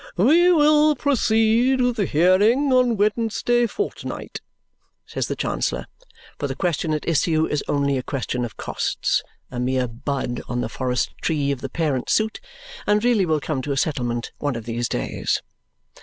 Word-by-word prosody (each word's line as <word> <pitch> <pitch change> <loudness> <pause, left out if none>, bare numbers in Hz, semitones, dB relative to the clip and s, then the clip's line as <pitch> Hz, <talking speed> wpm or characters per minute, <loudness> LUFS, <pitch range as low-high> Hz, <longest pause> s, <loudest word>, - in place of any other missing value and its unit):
"We 325 - +5
will 305 -1 +5
proceed 245 -1 +2
with 245 -1 +2
the 200 -5 +1
hearing 205 - +3
on 250 -3 +3
Wednesday 230 +3 +1
fortnight," 410 - -5 0.6
says - - -3
the - - -3
Chancellor. - - -2 0.5
For - - -1
the - - -4
question 165 -3 -1
at 150 - -5
issue 160 0 +2
is 150 - -2
only 140 -2 +1
a - - -2
question 125 -1 -3
of 115 -3 -6
costs, - - -1 0.3
a 125 - -5
mere 130 0 0
bud 120 +1 -4
on 120 0 -1
the - - -3
forest 125 -2 -2
tree 145 -3 0
of 135 -2 -4
the 135 - -4
parent 150 -6 -1
suit, 220 - +1 0.5
and 210 +1 +3
really 230 -7 +3
will 155 -1 +2
come 145 -2 -3
to 140 +2 -2
a - - -3
settlement 120 -5 -1
one 145 -3 -1
of 115 -2 -6
these 120 0 -2
days. - - -2
160 Hz, 170 wpm, -22 LUFS, -, 0.6 s, We